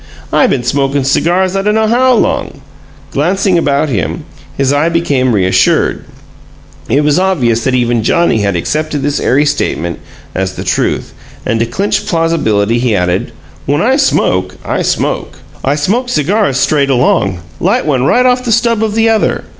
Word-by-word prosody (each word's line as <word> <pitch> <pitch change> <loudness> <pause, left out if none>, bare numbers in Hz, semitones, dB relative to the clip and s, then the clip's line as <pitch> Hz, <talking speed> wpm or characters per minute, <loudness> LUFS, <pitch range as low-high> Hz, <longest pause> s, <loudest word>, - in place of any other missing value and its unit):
I - - +4
been 125 - -1
smokin' 135 +2 0
cigars 180 +7 +1
I 195 - +1
dunno 210 +2 +1
how 250 +3 +3
long!" 145 -9 -1 0.5
Glancing 180 +4 +1
about 145 0 +1
him, 105 - -3 0.3
his 135 0 +1
eye 150 +3 +2
became 145 -7 0
reassured; 95 -2 +1 0.8
it 140 +5 +2
was 150 +2 +2
obvious 125 -12 +1
that 130 - +1
even 120 -2 +1
Johnnie 170 - +1
had 100 -2 0
accepted 150 - -2
this 145 0 -1
airy 145 +4 +2
statement 85 - -2 0.3
as 95 0 -2
the - - -5
truth, - - -1 0.3
and 115 - 0
to 115 - 0
clinch 195 - -2
plausibility 120 - +1
he 120 -3 +1
added: 90 -1 -1 0.4
"When 145 +5 +1
I 260 +4 +2
smoke, 95 - +1
I - - -1
smoke! - - -2 0.3
I 140 +2 +1
smoke 220 - -1
cigars 175 - +1
straight 140 0 +1
along 120 -8 +1 0.2
light - - +1
one 135 -5 +1
right 245 - +3
on 250 0 +3
the 240 - -2
stub 230 -1 +2
of 215 -1 -2
the 225 0 +2
other. 225 -1 +1
145 Hz, 165 wpm, -12 LUFS, 120-190 Hz, 0.8 s, I